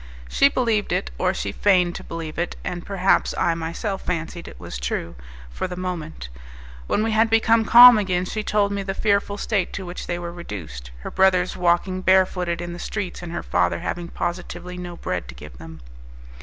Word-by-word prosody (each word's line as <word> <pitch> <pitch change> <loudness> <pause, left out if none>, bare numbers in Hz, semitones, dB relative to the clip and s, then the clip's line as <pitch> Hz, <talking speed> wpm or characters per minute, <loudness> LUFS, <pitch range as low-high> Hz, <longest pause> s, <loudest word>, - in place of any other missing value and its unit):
She 280 - +4
believed 230 -6 0
it, 65 - -1
or - - +2
she 100 - -3
feigned 180 - +3
to - - -7
believe 165 -1 -6
it, 175 - -2
and 175 -1 -4
perhaps 195 -1 +1
I 170 - +2
myself 170 +5 -4
fancied 170 0 -4
it - - -11
was 60 - -7
true 65 +6 -3 0.4
for 60 - -3
the 180 - -6
moment. 175 - -5 0.6
When 215 - +1
we 225 - 0
had 220 +1 +3
become 225 0 +3
calm 240 -1 +10
again, 185 -3 0
she 215 +3 -3
told 210 -1 +1
me 200 0 -2
the 195 0 -4
fearful 200 -1 +1
state 205 -4 -1
to 190 - -5
which 175 +1 -7
they 175 - -2
were 170 -1 -6
reduced, 80 - -8
her - - -6
brothers 185 -1 +3
walking 180 +1 +1
barefooted 180 -2 +2
in 175 0 -5
the 175 - -8
streets, 190 -2 -4
and 175 -1 -7
her 170 - -4
father 90 -1 0
having 175 -1 -4
positively 175 +1 -5
no 175 -1 -7
bread - - -3
to - - -10
give 75 +5 -12
them. 80 -1 -11
180 Hz, 195 wpm, -23 LUFS, 170-200 Hz, 0.6 s, calm